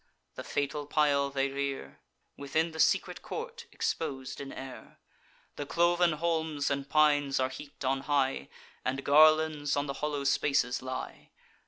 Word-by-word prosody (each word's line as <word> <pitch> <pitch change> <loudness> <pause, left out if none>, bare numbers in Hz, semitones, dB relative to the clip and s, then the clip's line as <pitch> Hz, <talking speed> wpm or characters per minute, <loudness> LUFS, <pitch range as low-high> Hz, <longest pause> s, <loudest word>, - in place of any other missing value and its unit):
The - - -7
fatal 145 0 -2
pile 145 -2 +2
they 135 0 0
rear, 135 - -4 0.4
Within 155 +4 -1
the 160 - -9
secret - - +2
court, 470 +1 -7
expos'd 135 -5 -3
in 135 -1 -7
air. 130 -1 -9 0.6
The 145 - -4
cloven 175 +1 +3
holms 160 -2 -1
and 140 0 -2
pines 145 -3 +3
are 130 0 +1
heap'd 140 +1 -9
on 135 +1 +1
high, 135 - 0 0.3
And 135 +2 -2
garlands 155 0 +4
on 145 - +1
the 140 - -3
hollow 150 -2 -1
spaces 135 -2 +1
lie. 130 0 -6
145 Hz, 145 wpm, -30 LUFS, 135-155 Hz, 0.6 s, garlands